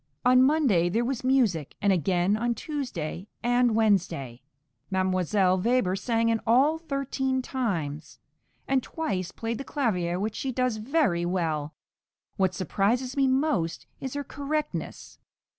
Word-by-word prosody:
On 255 0 +6
Monday 260 - +3
there 230 +6 0
was 255 -1 -2
music, 235 - +1
and 200 -2 +3
again 180 +3 +1
on 235 +2 0
Tuesday 210 - -4 0.2
and 245 -1 +3
Wednesday; 170 - +1 0.5
Mdlle. 185 0 +1
Weber 235 -6 +2
sang 230 +2 0
in 225 -1 +1
all 275 +8 +4
thirteen 270 -3 -2
times, 170 - -3 0.5
and 270 -1 +2
twice 195 - -3
played 230 +1 -4
the - - -4
clavier, 180 - -1
which 210 +2 -2
she 265 - -3
does 255 -2 0
very 215 - +1
well. 160 -4 -1 0.6
What 190 -2 +1
surprises 225 +8 0
me 275 -1 +3
most 260 - 0
is 265 +1 -5
her 285 - -2
correctness. 295 +2 -4
225 Hz, 135 wpm, -27 LUFS, 185-260 Hz, 0.6 s, On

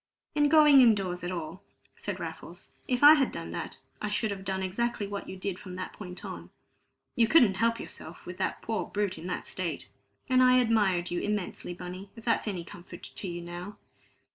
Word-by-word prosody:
"In 295 -1 +3
going 300 -3 +8
in 230 -3 +7
doors 180 -3 -3
at 175 - -2
all," 170 0 -5 0.3
said - - -5
Raffles. - - -8 0.2
"If 250 +1 0
I 295 +1 +12
had 285 -4 +3
done - - -6
that, - - -5 0.2
I 210 - -1
should 210 +1 0
have 195 -1 -5
done 190 0 -2
exactly 220 +3 -1
what 200 0 -5
you 190 - -6
did 185 -1 -3
from 185 -2 -8
that 185 0 -5
point 180 -3 -8
on. - - -7 0.7
You 230 -1 +4
couldn't 225 -11 +5
help 230 0 +2
yourself, - - -9
with - - -7
that - - -2
poor - - -2
brute 205 -4 -2
in 170 - -7
that 180 - -3
state. - - -4 0.4
And 255 -2 +4
I 255 0 +6
admired 205 -8 +2
you 175 - -1
immensely, 205 -3 -3
Bunny, 180 +2 -8
if 230 - -12
that's 230 -1 +1
any 185 -5 -2
comfort 175 +1 -11
to 195 - -6
you 175 -1 -5
now." 175 +4 -7
200 Hz, 205 wpm, -29 LUFS, 180-235 Hz, 0.7 s, I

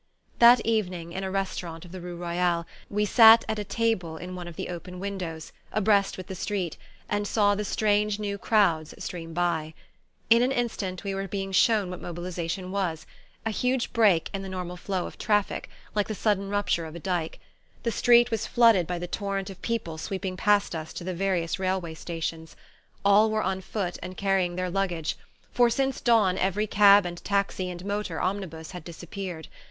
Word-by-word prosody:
That 235 0 +8
evening, 180 -7 -1
in 190 - -4
a 190 - -2
restaurant 180 -3 -3
of 175 - -13
the 185 -1 -7
rue 175 0 -6
Royale, 170 0 0 0.2
we 210 +1 +1
sat 225 +1 +8
at 220 - -2
a - - -2
table 200 -6 -1
in 180 +2 -7
one 180 -1 -6
of 170 - -9
the - - -5
open 180 +1 -7
windows, 180 -5 -5 0.2
abreast 205 -1 +2
with 185 - -7
the 190 - -7
street, 190 -3 -3 0.3
and 205 0 -1
saw 205 -1 +3
the 205 +1 -2
strange 210 0 +1
new 200 -1 -3
crowds 170 -9 +2
stream 165 -2 -6
by. 165 -3 -1 0.6
In 230 +1 +7
an 255 +2 +2
instant 220 -8 -2
we 200 -1 -2
were 195 0 -3
being 195 0 -4
shown 200 -1 +3
what 180 - -7
mobilization 175 +1 -4
was 175 -5 -2 0.4
a 225 - 0
huge 250 +3 0
break 205 -8 +3
in 195 - -3
the 195 - -6
normal 180 -1 -5
flow 185 0 -3
of - - -9
traffic, 210 -2 0 0.2
like 210 -1 0
the 215 - -3
sudden 200 -2 0
rupture 205 -4 0
of 160 - -10
a - - -6
dyke. 175 -2 -2 0.5
The 230 - 0
street 240 +1 +5
was 225 -2 -1
flooded 230 -8 +5
by 180 - -2
the 175 - -4
torrent 195 +1 -3
of 185 - -13
people 190 -9 -3
sweeping 190 +2 -4
past 205 0 +2
us 160 -1 -5
to - - -6
the 185 +1 -3
various 180 -1 -1
railway 185 -3 -1
stations. 160 0 -5 0.5
All 205 +2 +6
were 215 0 0
on 190 0 -1
foot, 185 -2 -3
and 185 0 -7
carrying 195 -3 +1
their 185 0 -2
luggage; 175 -5 -1 0.4
for 240 -1 +4
since 270 +2 0
dawn 210 -6 +3
every 195 +3 +1
cab 205 -1 +6
and 175 -1 -6
taxi 200 -2 0
and 180 +1 -7
motor 200 -5 -2
omnibus 180 -4 -3
had 180 -3 -8
disappeared. 175 0 -7
190 Hz, 190 wpm, -27 LUFS, 175-210 Hz, 0.6 s, That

